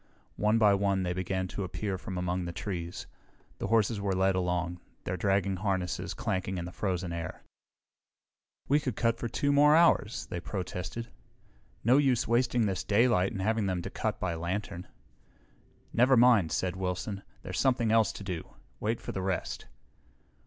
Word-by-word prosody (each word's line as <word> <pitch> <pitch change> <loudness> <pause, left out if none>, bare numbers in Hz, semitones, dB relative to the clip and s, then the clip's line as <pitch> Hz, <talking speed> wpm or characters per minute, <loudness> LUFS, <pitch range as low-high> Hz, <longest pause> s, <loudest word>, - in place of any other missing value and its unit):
One 105 +2 +3
by 105 -2 +5
one 100 -1 +1
they 90 -1 -1
began 95 +1 -2
to 100 - -4
appear 95 +1 -3
from 95 0 -6
among 90 0 -1
the 85 - -4
trees. 85 -1 -5 0.5
The - - -2
horses 110 -1 +2
were 100 -1 0
led 95 +1 +3
along, 90 -1 -1 0.2
their 95 - -2
dragging 95 +1 +1
harnesses 95 -2 -2
clanking 95 -1 -2
in 85 - -3
the 90 - -7
frozen 90 -2 -2
air. 85 0 -5 1.2
"We 145 +2 +4
could 130 -7 -3
cut 115 -1 +1
for 120 - -2
2 145 +5 0
more 145 +1 +6
hours," 160 -9 +3
they 85 - -5
protested. 95 +5 -5 0.7
"No 125 +5 +5
use 130 -4 +2
wasting 120 -1 +2
this 95 -3 -1
daylight 105 -3 +3
and 95 - -3
having 110 0 +1
to 85 - -5
cut - - -2
by 90 -2 -1
lantern." 90 +2 -4 1.1
"Never 125 +2 +5
mind," 115 -9 +5
said 90 -1 -1
Wilson. 95 +2 -3 0.2
"There's 95 0 -4
something 125 -4 +2
else 110 -1 +4
to - - -8
do. 90 -4 -6 0.2
Wait 115 +2 -1
for - - -6
the 95 - -3
rest." 95 -1 -3
95 Hz, 165 wpm, -30 LUFS, 90-115 Hz, 1.2 s, more